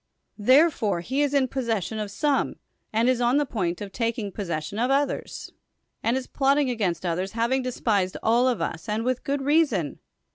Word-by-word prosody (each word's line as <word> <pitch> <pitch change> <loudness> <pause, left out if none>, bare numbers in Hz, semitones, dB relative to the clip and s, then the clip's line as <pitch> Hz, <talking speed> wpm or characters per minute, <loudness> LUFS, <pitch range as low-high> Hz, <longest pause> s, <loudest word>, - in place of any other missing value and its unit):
Therefore, 255 - +4
he 260 +10 -1
is 290 -1 +2
in 280 -2 +2
possession 225 -5 -2
of 210 -1 -3
some, 285 +7 0 0.4
and 225 +2 +2
is 255 -1 +2
on 245 +3 +3
the 295 - +2
point 185 -9 -2
of 200 -1 -6
[taking 230 -3 -2
possession 175 0 -4
of] 245 +2 +1
others, 280 +1 -1 0.5
and 235 +3 +1
is 260 - -4
plotting 275 -1 +2
against 190 -7 -1
others, 180 +3 -2
having 235 +3 +1
desi^ised 210 -7 0
all 235 +3 +3
of 240 -9 0
us, 165 +4 -5
and 215 +2 -1
with 255 -1 -1
good 280 0 -1
reason. 275 - +1
235 Hz, 180 wpm, -25 LUFS, 200-265 Hz, 0.5 s, Therefore